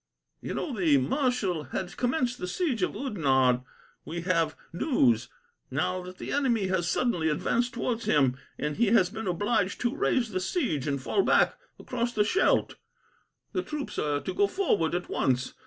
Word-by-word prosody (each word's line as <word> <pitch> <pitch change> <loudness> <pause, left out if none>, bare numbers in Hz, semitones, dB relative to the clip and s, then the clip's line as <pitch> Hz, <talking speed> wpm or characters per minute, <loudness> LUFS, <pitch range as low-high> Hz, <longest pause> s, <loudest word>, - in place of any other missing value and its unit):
"You - - -4
know 285 -7 -3
the 165 -8 +4
marshal 190 - 0
had 175 +7 -5
commenced 250 -1 0
the 180 - -3
siege 260 - -1
of 180 - 0
Oudenarde. 135 - +2 0.4
We 170 +2 -5
have 165 -3 +1 0.2
news 125 - +2 0.4
now 180 +7 -1
that 180 +1 -10
the - - -6
enemy 235 -9 +1
has 180 -2 0
suddenly 170 -4 +1
advanced 235 +10 0
towards 235 -1 -2
him, 135 -4 +3 0.2
and 150 0 -3
he 235 +1 +3
has 195 -4 +4
been 220 -1 -5
obliged 190 +2 0
to 245 +3 0
raise 255 - +1
the 185 - -1
siege, 185 - -1
and 140 -1 0
fall 135 - +1
back - - +4 0.2
across 240 -1 -3
the 210 - +3
Scheldt. 365 - +2 0.8
The 370 - 0
troops 300 -4 -5
are 145 -1 0
to - - -4
go 405 0 +3
forward 210 - +1
at 180 - -3
once. 130 0 0
185 Hz, 170 wpm, -28 LUFS, 155-245 Hz, 0.8 s, the